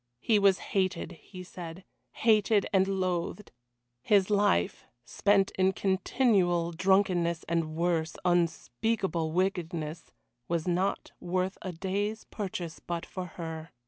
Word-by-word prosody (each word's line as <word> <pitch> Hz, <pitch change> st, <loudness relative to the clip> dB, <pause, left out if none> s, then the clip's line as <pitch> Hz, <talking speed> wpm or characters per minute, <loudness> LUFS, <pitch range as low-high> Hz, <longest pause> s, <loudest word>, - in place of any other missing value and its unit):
He 215 Hz, -, +3 dB
was 195 Hz, -1 st, +5 dB, 0.2 s
hated, 185 Hz, -3 st, 0 dB
he 180 Hz, +2 st, -11 dB
said, 175 Hz, 0 st, -9 dB, 0.3 s
hated 215 Hz, -2 st, +3 dB
and 190 Hz, 0 st, +4 dB
loathed; 185 Hz, +1 st, -2 dB, 0.5 s
his 200 Hz, +5 st, +3 dB
life 200 Hz, -, +2 dB, 0.2 s
spent 200 Hz, +4 st, +2 dB
in 190 Hz, +1 st, +4 dB
continual 190 Hz, -4 st, +2 dB
drunkenness, 175 Hz, -2 st, +2 dB
and 165 Hz, -2 st, -1 dB
worse, 165 Hz, -1 st, 0 dB
unspeakable 175 Hz, 0 st, 0 dB
wickedness 170 Hz, -3 st, -2 dB, 0.4 s
was 170 Hz, 0 st, -1 dB
not 185 Hz, +3 st, 0 dB
worth 185 Hz, +2 st, -2 dB
a 185 Hz, -, -4 dB
day's 200 Hz, +5 st, -2 dB
purchase, 180 Hz, -5 st, -5 dB
but 170 Hz, -1 st, -4 dB
for 185 Hz, -1 st, -6 dB
her. 160 Hz, -2 st, -6 dB
185 Hz, 115 wpm, -29 LUFS, 170-195 Hz, 0.5 s, was